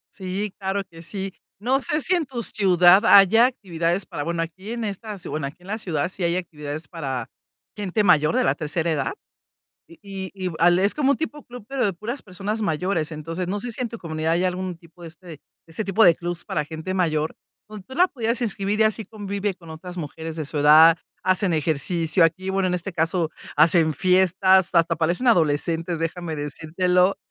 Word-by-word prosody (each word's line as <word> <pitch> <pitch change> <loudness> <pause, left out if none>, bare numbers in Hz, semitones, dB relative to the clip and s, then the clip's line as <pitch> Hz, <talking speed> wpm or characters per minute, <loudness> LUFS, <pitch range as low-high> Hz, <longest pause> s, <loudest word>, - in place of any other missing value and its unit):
Sí, 195 +1 -4
claro 195 0 -2
que 165 -3 -15
sí. 190 +2 -5 0.2
No 255 +6 +1
sé, 300 +3 0
si 365 - +1
en 345 -3 +1
tu 245 -3 -5
ciudad 185 -1 +5
haya 225 +3 +7
actividades 180 -7 -2
para 145 - -6
bueno, 165 +2 -1
aquí 185 +5 -9
en 235 -1 -3
esta 210 0 -5
ci 180 - -10
bueno, 150 -2 -3
aquí 140 - -11
en - - -15
la 215 +3 -3
ciudad 170 -4 -2
sí 190 - -5
hay 170 0 +1
actividades 155 -3 -6
para 135 -8 -5 0.4
gente 210 0 -1
mayor 160 -5 +4
de - - +3
la 135 - +3
tercera 160 +3 -2
edad. 145 -4 -1 0.8
Y 190 +2 -8
y 185 -2 -3
al 175 +1 +5
es 200 +2 +2
como 280 -2 +2
un - - +1
tipo 300 -2 -5
club, 245 -3 -11
pero 270 -1 -1
de 200 - 0
puras 225 +9 -6
personas 205 +3 -4
mayores. 165 -3 -1
Entonces, 165 +3 -5
no 195 +3 -2
sé 240 +4 -4
si, 230 - -5
en 245 - -2
tu 230 - -7
comunidad 160 -3 -2
hay 175 +2 +1
algún 185 -1 -2
tipo 170 +1 -20
de 170 - -8
este, 165 -1 -12 0.2
ese 165 +6 -5
tipo 200 +3 +3
de 170 - +7
clubs 175 0 -5
para 150 - -1
gente 160 +4 -6
mayor, 160 -4 0 0.3
donde 210 -2 -10
tú 260 - -10
la 360 +2 +5
pudieras 235 -6 -2
inscribir 205 -1 -2
y - - +7
así 220 +1 +1
convive 200 -2 -4
con 170 -3 -13
otras 180 +3 -9
mujeres 160 0 -6
de 155 -2 -4
su 150 +1 -3
edad, 155 +3 +8 0.3
hacen 185 -1 +1
ejercicio. 160 +2 +1
Aquí, 185 +4 0
bueno, 190 -1 +1
en 180 - 0
este 180 +2 -5
caso 165 0 0 0.2
hacen 160 +1 +4
fiestas, 185 +1 +4
hasta 165 -1 +3
parecen 170 +9 0
adolescentes, 165 -3 +1
déjame 165 0 -3
decírtelo. 180 +6 0
180 Hz, 205 wpm, -23 LUFS, 165-200 Hz, 0.8 s, edad